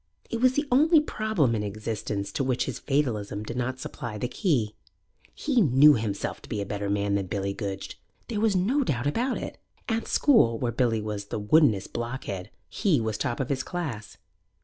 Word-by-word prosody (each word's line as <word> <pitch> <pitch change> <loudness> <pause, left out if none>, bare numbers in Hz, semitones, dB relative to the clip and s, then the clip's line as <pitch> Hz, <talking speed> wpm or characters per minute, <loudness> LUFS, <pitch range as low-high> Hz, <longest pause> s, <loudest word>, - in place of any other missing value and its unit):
It 230 - -2
was 255 0 +5
the 290 +2 -1
only 310 +5 +6
problem 215 - 0
in 110 - 0
existence 105 -1 -3
to 135 - -1
which 130 -2 0
his - - -4
fatalism 110 -8 -1
did 115 +2 -6
not 130 +1 -2
supply 120 -4 -6
the 125 - -2
key. 125 - 0 0.6
He 270 -6 +1
knew 150 - +7
himself 110 -5 -2
to - - -14
be 105 - -2
a 100 - -2
better 100 0 -3
man 100 0 0
than 100 -2 0
Billy 100 +1 -2
Goodge. 100 -2 -6 0.3
There 215 -4 -2
was 220 -3 +3
no 235 +11 +2
doubt 130 - -1
about 235 - 0
it. - - -6 0.3
At 225 -1 -1
school, 175 - +4
where 120 0 -1
Billy 115 -2 +1
was 105 -1 -4
the 100 - -4
woodenest 105 - +3
blockhead, 120 -6 -4 0.2
he 185 - +1
was 110 -2 -2
top 120 - -2
of 135 - -2
his 135 -2 0
class. 135 - -5
120 Hz, 195 wpm, -27 LUFS, -, 0.6 s, knew